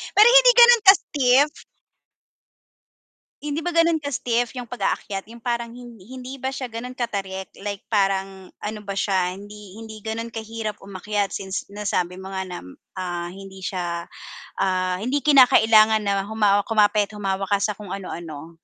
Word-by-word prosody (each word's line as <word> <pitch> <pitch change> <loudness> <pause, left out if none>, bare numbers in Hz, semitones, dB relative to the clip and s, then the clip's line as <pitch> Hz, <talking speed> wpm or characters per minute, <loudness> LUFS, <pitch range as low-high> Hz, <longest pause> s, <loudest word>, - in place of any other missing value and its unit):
pero 420 +3 +8
hindi - - +8
ganon 480 -1 +8
ka 385 - +11
steep. 275 0 +2 1.9
Hindi 295 +2 -3
ba 350 - -1
gano'n 335 0 +3
ka 285 - -3
steep 240 -1 -1
'yung 245 -3 -7
pag-aakyat 200 -5 -3
'yung 235 0 -13
parang, 235 -1 -3
hindi 245 +2 -10
ba 265 0 -3
siya 255 -1 -5
gano'n 235 +2 -7
katarik, 195 -6 -4 0.2
like 200 -1 -4
parang, 195 -2 -1
ano 210 +1 -5
ba 200 - -4
siya 190 -2 0
hindi, 205 0 -12
hindi 220 -2 -10
gano'n 225 +1 -4
kahirap 225 -1 -6
umakyat, 200 +1 -3
since 190 0 -4
nasabi 185 -3 -2
mo 190 0 -8
nga 190 -1 -3
na, 180 -1 -7 0.4
ah 175 -2 -4
hindi 195 0 -11
siya, 175 -2 -3 0.5
ah, 185 -1 0
hindi 265 +6 -1
kinakailangan 220 -6 +5
na 200 -1 0
humawa 205 -2 +2
kumapit 210 -2 +2
humawak 195 -1 -3
ka 200 - +3
sa 205 0 -1
kung 210 -3 -10
ano-ano? 170 -5 -7
210 Hz, 155 wpm, -23 LUFS, 195-245 Hz, 1.9 s, ka